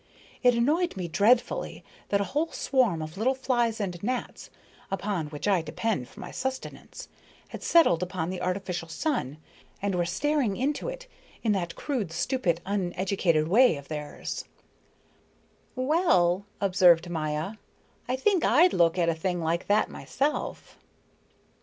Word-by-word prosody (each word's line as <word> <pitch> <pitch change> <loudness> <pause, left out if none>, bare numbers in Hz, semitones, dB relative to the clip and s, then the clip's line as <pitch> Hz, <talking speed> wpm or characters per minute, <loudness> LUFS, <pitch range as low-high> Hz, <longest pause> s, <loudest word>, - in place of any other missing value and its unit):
It 245 -2 +5
annoyed 300 - +1
me 180 -2 -3
dreadfully 230 +8 +1 0.3
that 200 - +2
a - - +1
whole 320 +3 0
swarm 230 -12 +1
of 155 +5 -8
little 260 +4 +2
flies 240 -4 0
and 180 -4 -3
gnats, 250 +3 -4 0.4
upon 195 -4 -2
which 150 +5 -5
I 195 -4 +3
depend 180 - -2
for - - -13
my - - -7
subsistence, 265 0 -5 0.4
had - - -8
settled 255 - +4
upon 180 -2 -2
the 185 -1 -5
artificial 180 -2 -2
sun 165 - -2 0.4
and 200 -1 -1
were 175 -1 +1
staring 270 - 0
into 285 - -1
it - - -7 0.4
in 225 - +2
that 175 -4 -1
crude, 240 - -3
stupid, 170 - 0
uneducated 185 -4 0
way 230 +2 +5
of 140 - -11
theirs." 150 -1 -5 1.3
"Well," 205 - +2
observed 180 -3 +4
Maya, 160 +4 -3 0.5
"I 250 - 0
think 360 +6 +2
I'd 350 +3 +5
look 170 0 +3
at 170 -2 +2
a 165 - +3
thing 175 +2 -2
like 165 +1 -1
that 210 +1 +3
myself." 290 +3 -3
195 Hz, 145 wpm, -27 LUFS, 170-255 Hz, 1.3 s, It